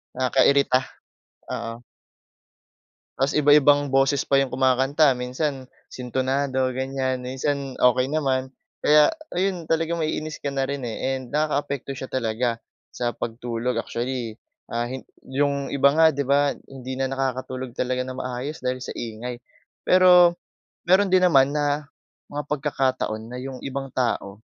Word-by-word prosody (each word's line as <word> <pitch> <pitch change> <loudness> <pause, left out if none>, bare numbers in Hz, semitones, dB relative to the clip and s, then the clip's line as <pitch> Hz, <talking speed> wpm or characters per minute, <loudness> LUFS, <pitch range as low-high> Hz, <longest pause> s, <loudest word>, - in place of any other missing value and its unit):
Nakakairita. 130 +1 +3 0.7
Oo. 115 +1 -5 1.3
Tapos 135 +2 +1
iba-ibang 145 -1 +5
boses 135 +1 +3
pa 140 - +4
yung 135 -1 +1
kumakanta, 135 +2 +3
minsan 130 +2 -3 0.2
sintunado, 130 +1 -1
ganyan, 130 -1 -2
minsan 135 +1 -2
okey 125 +2 +3
naman. 130 -4 0 0.3
Kaya 150 0 +6 0.2
ayun, 180 -2 -1
talagang 165 +1 0
maiinis 155 0 -3
ka 140 - -3
na 135 -1 0
rin 140 -2 -3
eh, 130 +4 -2
and 130 0 -11
nakakaapekto 145 -2 -1
siya 130 - -6
talaga 115 -1 -1 0.3
sa 120 -1 -1
pagtulog. 120 +1 -3
Actually, 120 -2 -3 0.3
ah, 120 +1 -1
hin 130 +1 -6 0.2
yung 140 +1 0
iba 140 0 +5
nga, 160 +1 +5
'di 140 - 0
ba, 140 0 +3 0.2
hindi 130 -1 -7
na 135 0 -1
nakakatulog 130 -1 -3
talaga 125 0 -1
nang 130 0 -6
maayos 130 +4 -5
dahil 130 0 -1
sa 125 - -6
ingay. 120 +2 -5 0.5
Pero 180 -1 +6 0.5
meron 190 +1 +4
din 185 -1 +5
naman 140 -5 +4
na 145 0 0 0.4
mga 145 0 -3
pagkakataon 135 -6 -1
na 125 - -6
yung 130 0 -6
ibang 135 0 -5
tao, 110 -4 -2
135 Hz, 135 wpm, -24 LUFS, 125-145 Hz, 1.3 s, Kaya